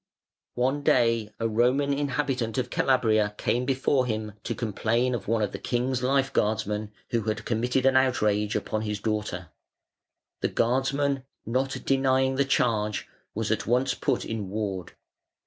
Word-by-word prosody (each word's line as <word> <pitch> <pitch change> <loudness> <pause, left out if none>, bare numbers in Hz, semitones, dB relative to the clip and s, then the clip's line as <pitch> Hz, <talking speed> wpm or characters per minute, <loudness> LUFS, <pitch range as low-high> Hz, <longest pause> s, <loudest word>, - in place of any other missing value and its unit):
One 130 +4 +1
day 115 -5 +2
a 115 - +1
Roman 125 +6 +2
inhabitant 135 -5 -1
of 125 -1 -1
Calabria 110 -5 +2
came 125 +2 0
before 130 0 +1
him 110 -2 -2
to 115 - -2
complain 115 +3 0
of 115 -5 -4
one 110 0 +1
of 105 - -1
the - - -6
king's 125 +1 -1
life 135 +1 +1
guardsmen 105 0 0 0.2
who 115 - +1
had 110 -1 -2
committed 125 +3 0
an 135 0 +4
outrage 105 -5 +2
upon 110 -1 -1
his 105 -1 -3
daughter. 105 -5 -3 0.9
The - - +1
guardsman, 135 +3 +1 0.2
not 130 +4 -1
denying 130 -1 +2
the 140 +1 +2
charge, 110 -5 0 0.3
was - - -1
at - - -1
once 125 +3 +2
put 135 -4 -1
in 105 -4 -4
ward. 100 -4 -4
120 Hz, 150 wpm, -27 LUFS, 110-130 Hz, 0.9 s, an